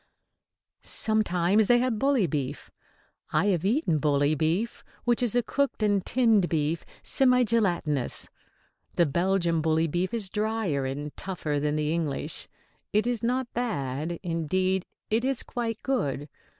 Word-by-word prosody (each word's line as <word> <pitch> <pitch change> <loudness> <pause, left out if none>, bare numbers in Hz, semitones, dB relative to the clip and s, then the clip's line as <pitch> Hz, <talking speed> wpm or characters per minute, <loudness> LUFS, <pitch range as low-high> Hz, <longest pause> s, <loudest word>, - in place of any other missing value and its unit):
] - - -64
Sometimes 205 -1 +1
they 245 - +6
have 240 -3 0
bully 270 -6 +3
beef. 145 -4 -4 0.6
I - - +2
have 170 -2 -1
eaten 200 - +1
bully 145 0 +2
beef, 165 +9 -1 0.2
which 240 0 +1
is 240 -2 +1
a 245 - +3
cooked 280 -1 -1
and 205 -2 +2
tinned 225 -7 +3
beef, 155 0 0 0.2
semi 250 -2 +3
gelatinous. 175 - 0 0.7
The 170 - +4
Belgian 170 +1 +1
bully 160 +1 +2
beef 175 +4 -1
is 225 -4 -2
drier 210 -9 -1
and 145 +2 -5
tougher 160 -6 -3
than 150 +1 0
the 150 +1 0
English. 160 -5 0 0.4
It 210 +2 +2
is 240 -2 -1
not 250 +1 -1
bad; 160 - -2
indeed, 185 +3 0 0.2
it 225 +2 +2
is 270 -1 0
quite 230 -2 -3
good. 145 - -1
185 Hz, 145 wpm, -27 LUFS, 155-230 Hz, 0.7 s, they